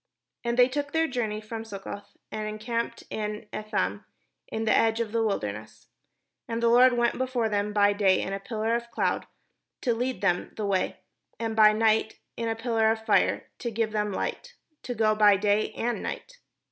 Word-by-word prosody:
And 235 0 -1
they 250 0 +7
took 285 +3 -3
their 325 0 +3
journey 230 -6 -2
from 225 +1 -6
Succoth, 200 -1 -8
and 215 0 -3
en 215 0 -5
camped 230 +1 -3
in 210 0 -4
Etham, 100 - -2 0.4
in 220 0 -3
the 220 - +4
edge 225 0 +3
of 230 -3 -2
the 230 0 +1
wilderness. 110 - -4 0.6
And 230 0 -3
the 235 - +5
Lord 250 +2 +6
went 240 0 +1
before 255 -3 0
them 205 0 0
by 205 -1 +4
day 195 -2 +3
in 195 - -3
a 195 - -2
pillar 220 +2 -2
of 235 0 0
a - - -23
cloud, 235 - -1 0.5
to 245 - +1
lead 245 -2 -2
them 180 -3 0
the 215 - -3
way; 195 -2 -1 0.4
and 225 -1 -2
by 215 -1 +7
night 220 0 +2 0.2
in 230 -1 -2
a 225 - -1
pillar 225 -1 +1
of 220 0 -1
fire, 215 - +2
to 240 - -3
give 225 -1 -1
them 210 -1 -1
hght; 485 - -4 0.3
to 245 - -5
go 215 -1 +3
by 210 -2 +5
day 205 +1 +1
and 240 0 -2
night. - - -6
220 Hz, 195 wpm, -27 LUFS, 210-235 Hz, 0.6 s, they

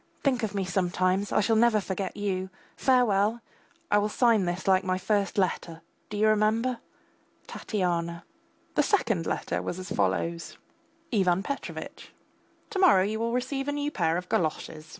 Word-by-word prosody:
Think 260 -4 +2
of 210 -3 -3
me 195 -1 -1
sometimes; 185 +1 0
I - - +3
shall 225 +2 +2
never 225 -1 +4
forget 195 0 -4
you. 190 -2 -2 0.3
Farewell! 230 -4 +2 0.5
I 205 0 +3
sign 225 -2 +3
this 175 +1 -2
last - - -11
like 190 0 +4
my 185 0 0
first 200 +2 0
letter, 170 -4 -1 0.3
do 210 - -5
you 215 +1 +3
remember? 220 +3 +2 0.7
TATYANA. 170 -4 -2 0.5
The - - +3
second 225 - +1
letter - - -2
was 180 - -4
as 185 +1 -8
follows: 135 - -1 0.5
IVAN 190 -4 +2
PETROVITCH, 280 +4 -6 0.6
To 395 - -2
morrow 320 - +6
you 215 +3 -2
will 230 +1 -1
receive 265 +3 -2
a - - +1
new 290 0 -2
pair 165 - +1
of 180 0 -5
galoshes. 155 -2 -2
200 Hz, 160 wpm, -27 LUFS, 185-230 Hz, 0.7 s, morrow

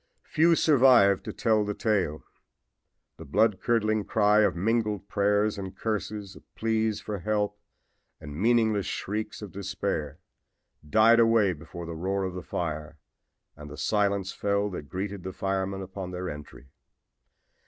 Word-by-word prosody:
Few 165 +2 +3
survived 125 - +5
to - - -4
tell 110 -2 +1
the 105 0 -3
tale. 95 -9 0 0.9
The 80 - -9
blood 100 +6 +1
curdling 110 -2 +1
cry 105 +2 +3
of 105 - +3
mingled 105 +1 -1
prayers 105 +1 +1
and 95 -1 -7
curses, 105 -2 -4
of - - -19
pleas 110 -1 0
for 105 -2 -5
help 105 +2 -1 0.6
and 75 -2 -9
meaningless 110 +1 +2
shrieks 105 +1 -4
of 100 - -8
despair 95 -6 -3 0.7
died 115 +5 +5
away 115 -4 +4
before 85 +2 -9
the 85 - -6
roar 95 +4 -2
of 95 -1 -3
the 90 - -5
fire 80 -3 -4 0.6
and 75 0 -10
the 75 - -10
silence 100 -2 0
fell 100 0 0
that 75 -6 -7
greeted 95 +2 -4
the 95 +1 -6
firemen 95 0 -2
upon 95 -1 -7
their 90 0 -4
entry. 75 -2 -11
100 Hz, 145 wpm, -27 LUFS, 90-110 Hz, 0.9 s, survived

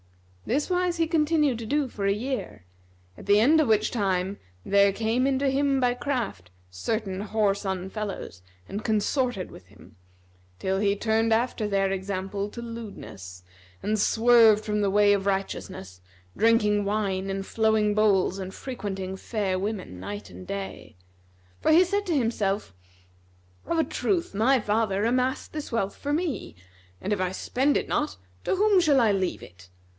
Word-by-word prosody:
This 285 +5 0
wise 360 -1 +1
he 330 - +2
continued 305 -5 +2
to 230 - -6
do 290 +2 +1
for 200 -5 -3
a - - +3
year, 220 - -4 0.5
at - - -12
the 205 +1 +5
end 305 +8 +5
of 300 - +1
which 215 -1 +2
time 195 -3 -1 0.3
there 200 0 +4
came 225 +5 0
in 270 -1 +1
to 275 0 +1
him 275 0 +2
by 250 -1 +2
craft 240 - -3 0.2
certain 195 - -3
whoreson 200 -3 -1
fellows 205 - -5 0.3
and 205 +2 -5
consorted 220 -1 0
with 90 - -13
him, 100 +1 -18 0.6
till 190 - -1
he 200 -1 +2
turned 225 +2 +1
after 225 -1 +1
their 195 -1 +1
example 195 +1 -3
to 235 - -8
lewdness 150 - -9 0.4
and 215 +1 0
swerved 225 -1 +5
from 210 -1 0
the 200 - +2
way 205 +1 +5
of 200 0 -1
righteousness, 95 - -3 0.3
drinking 210 -2 +3
wine 200 -2 -1
in 195 0 -2
flowing 220 0 +2
bowls 200 -3 +2
and 190 0 -6
frequenting 195 -7 -5
fair 190 -2 -2
women 190 - -4
night 100 +1 -7
and 90 0 -11
day; 100 -1 -6 0.6
for - - +3
he 345 +4 +7
said 405 +2 -1
to 330 -4 +1
himself, 210 - -1 0.9
"Of 335 - 0
a 325 - +4
truth 355 0 -1
my 245 +6 +3
father 210 -1 0
amassed 255 +2 0
this 300 -1 -5
wealth 200 -4 -1
for 285 - -4
me, 320 -1 -2 0.4
and 205 - -1
if 200 - -1
I 185 -1 0
spend 265 +8 +1
it - - -2
not, 300 0 -1 0.3
to - - 0
whom 405 -1 +4
shall 295 -5 +4
I 225 -4 +4
leave 190 -2 -1
it? 90 +1 -15
210 Hz, 165 wpm, -26 LUFS, 195-250 Hz, 0.9 s, he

